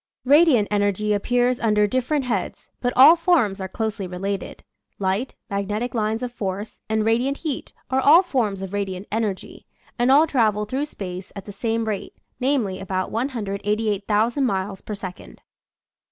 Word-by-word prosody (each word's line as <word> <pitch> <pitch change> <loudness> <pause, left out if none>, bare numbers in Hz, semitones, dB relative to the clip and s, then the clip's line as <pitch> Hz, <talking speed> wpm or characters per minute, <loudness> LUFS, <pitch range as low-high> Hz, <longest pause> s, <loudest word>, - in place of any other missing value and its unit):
Radiant 280 -6 +5
energy 205 0 +1
appears 245 +4 +1
under 210 -2 +3
dif 255 +4 -1
ferent 300 -3 +1
heads, 230 -7 -3
but 245 - +1
all 280 +6 +9
forms 310 - +2
are 190 - -3
closely 215 0 -3
related. 190 +2 -5 0.3
Light, 195 +6 -1
magnetic 205 +4 -2
lines 220 +1 -1
of 250 - -3
force, 205 -2 -5
and 220 0 +1
radiant 245 +5 +1
heat 300 -5 -4 0.2
are 260 - +2
all 320 +7 +7
forms 220 - -1
of 190 0 -7
radiant 195 -1 -3
energy, 215 -3 -3 0.3
and 245 +2 +3
all 295 +4 +7
travel 215 -8 +1
through 265 +7 -2
space 185 -8 -7
at 200 - -8
the 205 - -8
same 225 +3 -1
rate, 210 -3 -4 0.2
namely, 250 -8 0
about 185 -1 -3
188,000 215 0 -1
miles 195 -4 -1
per 210 - -6
second. 185 -2 -9
215 Hz, 155 wpm, -23 LUFS, 200-250 Hz, 0.3 s, all